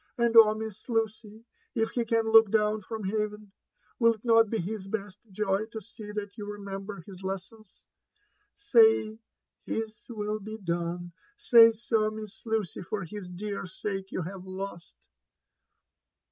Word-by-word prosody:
And 235 -1 +2
oh. 215 -1 +8
Miss 220 +1 -7
Lucy! 220 -1 -2 0.3
if 225 -1 +1
he 240 -2 -1
can 225 0 +1
look 225 -1 +7
down 215 0 +2
front 220 +1 -6
heavdn, 210 0 -3 0.5
will 230 -1 +5
it 215 - -21
not 225 -2 +5
be 225 - -1
his 195 +2 -4
best 200 -2 -5
joy 200 +1 -1
to 225 -1 -7
see 215 0 -11
that 205 -1 -5
you 205 0 -5
remember 200 -1 -6
his 190 -2 -11
lessons? 195 +2 -7 0.7
^Say, 410 - +4 0.4
His 220 -1 -3
will 215 -2 -3
be 215 +2 -7
done 175 -2 -3
!— 275 - -35
say 230 -1 +10
so, 220 -1 0
Miss 215 -1 -9
Lucy, 220 -7 -1
for 195 +3 -4
his 185 +2 -8
dear 200 +2 -5
sake 195 +1 -5
you 185 - -2
have 185 +2 -7
lost 190 -2 -7
210 Hz, 155 wpm, -28 LUFS, 195-225 Hz, 0.7 s, say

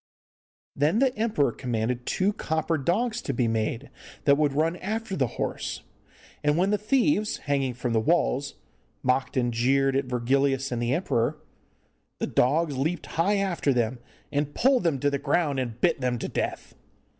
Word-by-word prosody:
Then 150 +8 +2
the 260 0 +2
emperor 215 - +1
commanded 120 0 -2
two 195 +2 +1
copper 160 -3 -1
dogs 220 - 0
to 140 - -3
be 120 -1 +1
made 115 +4 -2 0.3
that 140 - +6
would 145 -1 +1
run 160 +4 +1
after 215 +1 -3
the 130 -6 +1
horse, - - -3 0.6
and 150 +1 +2
when 190 +3 +2
the 210 - +1
thieves, 235 -1 +1
hanging 135 -3 -1
from 125 -1 -2
the 110 - +3
walls, 140 0 +1 0.5
mocked 130 +1 0
and 120 -2 +1
jeered 135 +3 +2
at 135 0 +1
Virgilius 135 +2 +1
and 120 -1 -2
the 120 +1 0
emperor, 150 -4 0 0.8
the - - -1
dogs 150 +3 +1
leaped 160 +7 -1
high 195 +5 +1
after 185 -7 0
them 120 0 0 0.3
and 145 0 -1
pulled 260 0 +3
them 165 -5 +1
to 145 +2 +1
the 140 - -1
ground, 145 -1 +1
and 120 -3 -4
bit 170 -5 +2
them 125 -1 0
to - - -4
death. - - -3
140 Hz, 170 wpm, -26 LUFS, 125-175 Hz, 0.8 s, that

